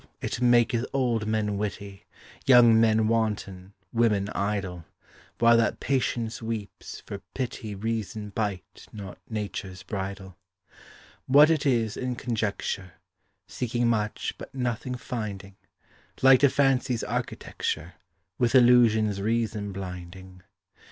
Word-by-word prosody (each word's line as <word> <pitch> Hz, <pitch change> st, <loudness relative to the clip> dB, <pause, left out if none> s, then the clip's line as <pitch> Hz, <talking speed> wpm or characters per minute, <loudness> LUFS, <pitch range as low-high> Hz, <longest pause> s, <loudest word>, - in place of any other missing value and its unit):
it -, -, -4 dB
maketh 120 Hz, -1 st, +3 dB
old 120 Hz, -5 st, 0 dB
men 105 Hz, -2 st, -1 dB
witty, 100 Hz, -1 st, -6 dB, 0.4 s
Young 120 Hz, -3 st, +7 dB
men 110 Hz, -1 st, +3 dB
wanton, 105 Hz, -4 st, -2 dB, 0.2 s
women 105 Hz, -4 st, +2 dB
idle, 100 Hz, -5 st, -3 dB, 0.5 s
While 115 Hz, 0 st, +5 dB
that 115 Hz, -2 st, +1 dB
patience 120 Hz, -4 st, -1 dB
weeps, 110 Hz, -3 st, -6 dB
for 100 Hz, -, -6 dB, 0.2 s
pity 115 Hz, -5 st, -4 dB
Reason 110 Hz, 0 st, -3 dB
bite 100 Hz, -3 st, -4 dB
not 100 Hz, -3 st, -9 dB
nature's 100 Hz, -4 st, -5 dB
bridle. 95 Hz, -1 st, -6 dB, 0.9 s
What 145 Hz, +4 st, +7 dB
it 155 Hz, -2 st, +1 dB
is, 115 Hz, -5 st, +1 dB
in 125 Hz, -1 st, -2 dB
conjecture; 105 Hz, -6 st, -3 dB, 0.5 s
Seeking 120 Hz, 0 st, -1 dB
much, 105 Hz, -2 st, -1 dB
but -, -, -10 dB
nothing 125 Hz, 0 st, -2 dB
finding; 100 Hz, -6 st, -6 dB, 0.7 s
Like 135 Hz, -1 st, +8 dB
to 140 Hz, -, +5 dB
fancy's 130 Hz, -3 st, +1 dB
architecture 80 Hz, +3 st, -3 dB, 0.5 s
With 120 Hz, +1 st, +2 dB
illusions 115 Hz, -5 st, +5 dB
reason 110 Hz, -1 st, -1 dB
blinding. 95 Hz, 0 st, -8 dB
110 Hz, 110 wpm, -26 LUFS, 100-120 Hz, 0.9 s, Like